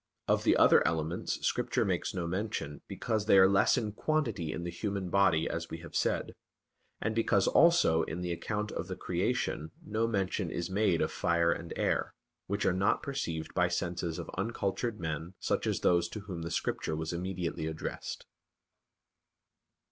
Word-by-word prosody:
Of - - +2
the - - +4
other - - +7
elements, 80 +1 -2
Scripture - - +1
makes - - -1
no 90 -3 -3
mention, 90 -5 -3
because 110 -2 -2
they 100 - +7
are 95 0 +8
less 100 +6 +4
in 110 -4 -1
quantity 115 - -1
in 85 - -4
the 85 - -3
human 95 0 -3
body, 85 -5 +3
as 85 0 -4
we 80 - -5
have 85 - -11
said; - - 0 0.7
and 110 - -1
because 110 -3 +2
also 170 - +5
in 85 +3 -4
the 90 -1 -2
account 105 +5 -3
of - - -4
the - - -4
Creation 80 +1 -1 0.2
no 110 +2 0
mention 95 -4 -1
is 85 +2 -3
made 95 -4 +2
of - - -1
fire 85 0 +2
and 85 0 -4
air, - - 0 0.3
which 100 +1 -1
are 95 - +3
not 95 +2 +1
perceived 85 - -3
by 90 -1 +3
senses 85 -1 -2
of - - -6
uncultured 110 0 -2
men 80 +2 -4
such - - -1
as - - 0
those 85 -1 +3
to 105 - -6
whom 95 -4 -6
the 80 - -4
Scripture 80 0 -1
was 80 +2 -3
immediately 85 -2 -3
addressed. 80 0 -5
90 Hz, 175 wpm, -31 LUFS, 85-105 Hz, 0.7 s, are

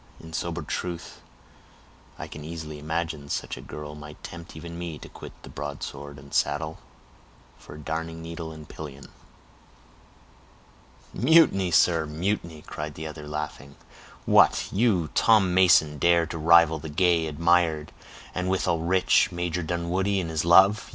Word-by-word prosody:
In 80 0 -12
sober 85 +1 -3
truth, 85 +2 -5 1.0
I - - -6
can 75 - -9
easily 80 -1 -7
imagine 80 -1 -3
such - - -3
a - - -10
girl 75 0 -8
might 75 0 -11
tempt 85 -1 -9
even 85 +1 -8
me 85 -3 -5
to - - -11
quit - - -11
the - - -10
broadsword 70 0 -7
and 70 +1 -14
saddle, 80 +2 0 0.8
for - - -12
a - - -10
darning 80 +2 -4
needle 80 0 -7
and 80 -1 -11
pillion." 70 -3 -9 2.0
"Mutiny, 125 - +4
sir, 85 -2 +3
mutiny," 85 0 -3
cried 75 -1 -6
the 80 - -7
other, 75 -1 -8
laughing. 75 -1 -6 0.5
"What, - - +4
you, 95 -7 +2
Tom 105 -5 +4
Mason, 80 -5 +4
dare 85 +2 +4
to 80 - -6
rival 80 0 +5
the 80 +1 -7
gay, 85 +1 +2
admired, 80 0 +1 0.4
and 90 0 -2
withal 90 -3 +1
rich, 90 +2 +3
Major 90 0 -2
Dunwoodie 90 +4 -1
in 85 -3 -3
his 80 -2 -1
love! 95 +5 +5
80 Hz, 145 wpm, -26 LUFS, 75-85 Hz, 2.0 s, rival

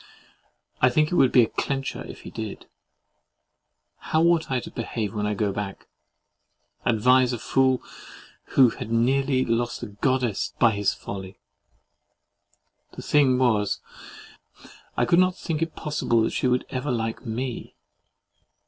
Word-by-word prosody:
I 125 - +6
think 155 +4 +1
it - - -2
would 135 -6 +4
be 125 - +6
a - - +1
CLENCHER, 135 -1 -3
if - - -10
he - - -10
did. 110 -2 -6 1.3
How 160 +1 0
ought 170 -1 +3
I 130 -2 +1
to - - -9
behave 110 -3 -4
when 105 -1 -1
I 105 - -1
go 105 0 0
back? 100 -1 -5 1.0
Advise 125 +2 +4
a - - -2
fool, 130 +1 +1 0.7
who 130 -3 +7
had 110 - -7
nearly 130 +3 +2
lost 120 +1 -1
a 120 - -5
Goddess 120 +1 -1
by 120 -2 +5
his 100 -1 +1
folly. 95 -1 -8 1.6
The - - -9
thing 135 -4 +3
was, 110 -5 +1 1.2
I - - +3
could 170 - +4
not 185 0 +3
think 160 -2 -3
it 165 -1 -2
possible 120 -7 0
she - - -1
would 125 0 +1
ever 130 +3 -3
like 115 -2 -2
ME. 120 +1 -5
125 Hz, 145 wpm, -25 LUFS, 110-135 Hz, 1.6 s, who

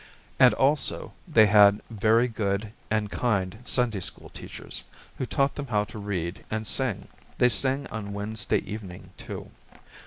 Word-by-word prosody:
And - - +6
also, 145 +2 +1
they 110 - +6
had 105 0 +6
very 110 +3 +3
good 105 -2 -2 0.2
and 110 -1 -1
kind 105 -4 -1
Sunday 125 -5 +2
school 90 - -5
teachers, - - -8 0.4
who 130 - -2
taught 140 +1 +1
them 145 -1 -6
how 105 -4 +1
to 105 - -9
read 95 -4 -4
and 110 0 -3
sing. 110 -4 0 0.3
They 125 - +4
sing 135 +5 +4
on 105 -2 -5
Wednesday 105 +2 -1
evening, 95 -3 -8
too. - - -8
110 Hz, 150 wpm, -26 LUFS, 100-120 Hz, 0.4 s, And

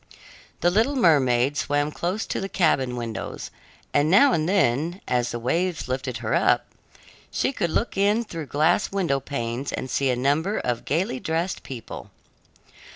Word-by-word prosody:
The 175 - +3
little 225 +9 +2
mermaid 140 - +3
swam 145 0 0
close 180 +7 -2
to - - -3
the 195 - -4
cabin 135 -10 +1
windows, 115 -2 -5 0.4
and 145 +2 +3
now 270 +10 +6
and 160 +1 0
then, 170 -1 +1
as 120 -1 +1
the 120 - -3
waves 165 +8 -1
lifted 130 -1 -3
her - - 0
up, - - +3 0.6
she 130 +2 -1
could 170 - -1
look 230 - -1
in 205 +4 +2
through 165 -8 -7
glass 150 +9 +2
window 175 -9 0
panes 130 -1 -4
and 130 - -4
see 135 -1 +1
a 125 - +2
number 145 - +1
of 120 -2 -2
gayly 155 -3 -1
dressed 165 +5 -2
people. 125 -4 -8
150 Hz, 160 wpm, -24 LUFS, 130-180 Hz, 0.6 s, now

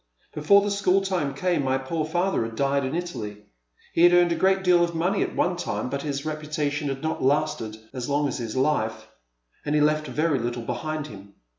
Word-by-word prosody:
Before 200 +7 +4
the 205 - -1
school 195 -1 +2
time 175 -8 -1
came 175 0 0
my 130 0 +1
poor 155 +4 -3
father 175 0 0
had 115 0 -6
died 140 +2 +1
in 130 +4 -3
Italy. 115 -13 -5 0.5
He - - +1
had 175 0 +7
earned 175 -1 +5
a - - +2
great 190 +2 +2
deal 180 -2 +5
of 170 -1 -2
money 180 +5 +1
at - - -2
one 180 - +1
time, 150 -6 -3
but 140 - -2
his 140 -1 -4
reputation 150 -1 -2
had 135 +1 -5
not 160 - -2
lasted 135 -6 0 0.2
as 125 -1 -4
long 145 +1 +1
as 130 - -4
his 115 -1 -5
life, 130 -5 0 0.5
and 150 0 -1
he 150 - +3
left 155 0 +2
very 155 -3 0
little 120 0 -3
behind 155 +4 -3
him. 100 -5 -12
150 Hz, 210 wpm, -25 LUFS, 135-175 Hz, 0.5 s, had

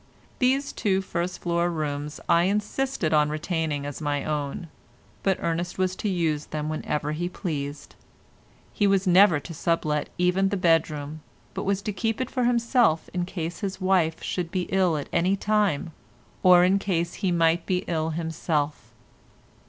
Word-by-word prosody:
These 270 +2 +1
two 190 -2 +1
first 180 -1 -3
floor 170 0 +1
rooms 150 -2 -3
I 170 +1 +4
insisted 210 -2 -1
on 150 -1 +4
retaining 155 -2 -2
as 145 +2 -6
my 145 -2 -1
own, 150 +2 -3 0.5
but 195 -2 +1
Ernest 170 +1 -2
was 185 0 0
to 210 - -2
use 160 -5 0
them 155 0 -3
whenever 150 -1 -2
he 175 +3 -2
pleased; 145 -6 -5 0.8
he 205 - +2
was 195 0 +2
never 180 -3 +6
to 165 - -8
sublet 155 -2 0
even 180 +2 +2
the 200 - -1
bedroom, 155 -3 +1 0.3
but - - -4
was 200 0 0
to 210 - -3
keep 225 +3 -1
it 255 -1 -3
for 250 -2 0
himself 235 - +2
in 180 -1 -1
case 170 -2 -5
his 195 -3 -4
wife 185 -4 +1
should 175 -3 -2
be 180 +1 -1
ill 185 -4 +2
at 145 - -5
any 180 +3 +2
time, 200 -6 0 0.5
or 180 -1 +7
in 190 +2 +3
case 170 -4 -1
he 190 -3 +1
might 165 0 +2
be 180 -2 0
ill 160 -1 -1
himself. 160 -2 -2
175 Hz, 165 wpm, -25 LUFS, 155-195 Hz, 0.8 s, or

